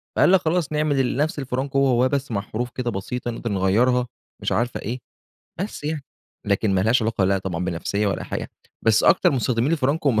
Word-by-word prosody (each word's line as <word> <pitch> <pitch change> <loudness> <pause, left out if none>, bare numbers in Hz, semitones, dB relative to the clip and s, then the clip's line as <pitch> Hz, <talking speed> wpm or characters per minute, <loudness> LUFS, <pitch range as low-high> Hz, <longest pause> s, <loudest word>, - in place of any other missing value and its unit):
فقال - - +5
لك 190 - +6
خلاص 160 -1 0
نعمل 145 -5 +1
نفس 150 +1 0
الفرانكو 135 +1 -1
هو 135 - +4
هواه 125 0 +3
بس 140 -1 -2
مع 100 -3 0
حروف 115 +4 -4
كده 125 -2 -3
بسيطة 120 +5 -4
نقدر 115 -1 -4
نغيرها 115 +6 +2 0.3
مش - - -1
عارف 120 +2 0
إيه، 120 +5 -4 0.6
بس 195 -6 -5
يعني 150 -2 -3 0.4
لكن 100 0 +1
ما 95 - +3
لهاش 115 +5 +3
علاقة 110 -3 +1
لأ 95 +1 +2
طبعًا 90 -2 -3
بنفسيّة 95 +4 -1
ولا 100 - -1
حاجة. - - -5 0.3
بس 110 -1 +4
أكتر - - +5
مستخدمين 125 +1 +1
الفرانكو 145 0 +1
هُم 110 -3 +2
125 Hz, 200 wpm, -23 LUFS, 105-140 Hz, 0.6 s, لك